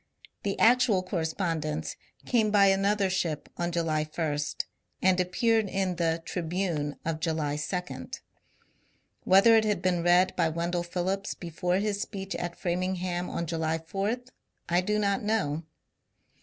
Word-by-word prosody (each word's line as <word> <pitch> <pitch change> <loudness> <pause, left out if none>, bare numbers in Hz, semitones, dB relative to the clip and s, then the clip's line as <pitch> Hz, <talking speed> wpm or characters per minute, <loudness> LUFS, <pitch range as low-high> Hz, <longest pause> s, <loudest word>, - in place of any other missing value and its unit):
The 200 -1 -2
actual 235 -5 +4
correspondence 160 -3 -2 0.3
came 225 -4 +2
by 200 -1 +5
another 195 +1 +2
ship 170 -5 -2
on 175 0 -2
July 165 -3 0
1, 155 -1 -2 0.7
and 185 0 +4
appeared 215 +4 +2
in 190 -2 -1
the 165 -1 0
" - - -35
Tribune 165 -4 -2
" - - -35
of 160 -1 -1
July 155 -3 -1
2. 180 +4 -4 1.2
Whether 195 +5 +7
it 220 - +5
had 210 -1 +1
been 180 -2 +2
read 175 +2 +4
by 165 - +2
Wendell 170 +2 -1
Phillips 185 +3 -2
before 175 +1 -2
his 205 0 -1
speech 195 -3 -5
at 175 0 -4
Framingham 180 0 -2
on 170 - -2
July 160 0 -1
4, 195 +7 -2 0.5
1 175 +1 +2
do 210 +1 +1
not 200 -1 +1
know. 205 -8 0
180 Hz, 145 wpm, -28 LUFS, 165-195 Hz, 1.2 s, Whether